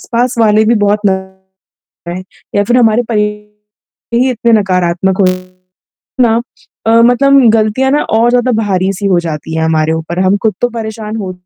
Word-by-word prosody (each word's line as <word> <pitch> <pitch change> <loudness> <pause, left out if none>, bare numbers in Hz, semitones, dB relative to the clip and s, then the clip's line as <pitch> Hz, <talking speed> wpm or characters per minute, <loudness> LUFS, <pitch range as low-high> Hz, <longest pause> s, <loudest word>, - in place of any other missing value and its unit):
आस-पास 245 +1 -1
वाले 215 -1 +3
भी 235 +2 +2
बहुत 205 +1 +1
नकारात्मकताएँ 190 0 -6 0.8
या 205 - +2
फिर 240 +4 +1
हमारे 230 0 +3
परिवार 210 +1 -5
ही 255 +2 +2
इतने 235 0 0
नकारात्मक 185 -1 0
हो - - +4 1.0
ना 225 -1 +2 0.5
अ - - +4
मतलब 275 +3 +4
गलतियाँ 225 +5 +1
ना 295 - +1 0.2
और 235 +1 +3
ज़्यादा 250 0 +1
भारी-सी 195 0 -1
हो 185 -3 +2
जाती 160 +1 -5
है 160 - -1
हमारे 160 0 +1
ऊपर 160 +2 -4
हम 195 +2 +2
खुद 215 -4 +1
तो 245 - +1
परेशान 220 -2 -6
हो 190 -3 -5
210 Hz, 160 wpm, -12 LUFS, 190-235 Hz, 1.0 s, हो